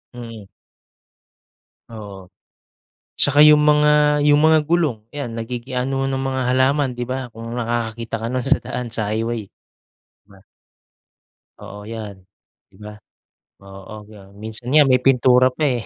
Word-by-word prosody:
Mm. 115 -3 -10 1.5
Oo. 100 -4 -11 0.9
Tsaka 145 +1 +6
yung 150 0 +6
mga 150 0 +3
yung 145 0 +4
mga 160 +1 +5
gulong, 150 -9 -1
'yan 130 -6 -6
nagiging 120 +2 -6
anohan 135 +1 -1
ng 135 - -3
mga 130 0 -2
halaman, 130 +2 +1
'di 120 - -3
ba. 130 +1 -5
Kung 115 0 -10
nakakakita 115 -1 -4
ka 115 - -6
no'n 130 -1 -3
sa - - +3
daan, 125 -1 -5
sa 110 -2 -3
highway. 115 -1 -3 0.6
'Di - - -65
ba? 95 - -18 1.2
Oo 105 +1 -10
'yan, 110 -3 -7 0.5
'di - - -23
ba. 105 0 -9 0.7
Oo 100 +2 -12
yan, 100 -2 -16
minsan 110 +3 -8
nga 150 0 +6
may 125 -1 +3
pintura 125 -1 +4
pa 155 - -3
eh, 125 -5 0
120 Hz, 145 wpm, -20 LUFS, 110-135 Hz, 1.5 s, Tsaka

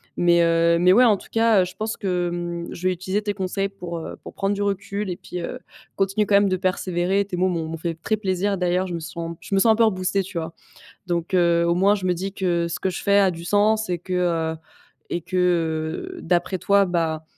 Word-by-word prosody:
Mais, 170 -1 +4
heu, 170 0 +3
mais 180 +2 +5
ouais 250 +5 +6
en 215 -4 +4
tout - - -15
cas, 225 -3 +4
heu, - - +1
je 180 - -9
pense 220 +1 -3
que, 180 -3 -1
mmh, 175 0 -4
je 180 +2 -3
vais 185 - +2
utiliser 190 +4 -2
tes 205 - -1
conseils 195 0 -2
pour, 180 -3 -7
heu, 165 - -6
pour - - -11
prendre 195 0 0
du 205 - -3
recul 200 0 -2
et 175 - -4
puis, 180 - -7
heu, - - -5 0.4
continuer 195 +2 +1
quand 205 - +3
même 200 -1 +4
de 185 - +1
persévérer, 185 +1 0
tes 195 -2 -5
mots 180 +1 +2
m'ont 165 -2 -2
m'ont 165 +1 -5
fait 165 +1 -3
très 165 +7 -1
plaisir 195 -1 -1
d'ailleurs. 180 +1 +1
Je 180 - -5
me 170 - -3
sens 170 +1 -6
je 195 - -3
me - - +4
sens 225 +3 +5
un - - +4
peu 230 - +3
reboostée 190 -1 0
tu 185 -2 -7
vois? 160 0 -4 0.5
Donc, 175 +1 -1
heu, 170 -1 +3
au 170 - +2
moins, 195 +3 +4
je 195 -3 -3
me 180 - +3
dis 190 +3 -4
que 175 -3 0
ce 170 - -4
que 190 - 0
je 180 - -5
fais 200 0 +4
a 195 -1 +4
du 170 -1 -7
sens 215 +3 +2
et 175 - -1
que, 185 +1 -6
heu, 165 -3 0 0.5
et 175 - -1
que, 185 +3 -4 0.8
heu, - - -8
d'après 175 +2 0
toi, 200 +2 +3
bah, 165 -3 -1
185 Hz, 255 wpm, -23 LUFS, 170-200 Hz, 0.8 s, ouais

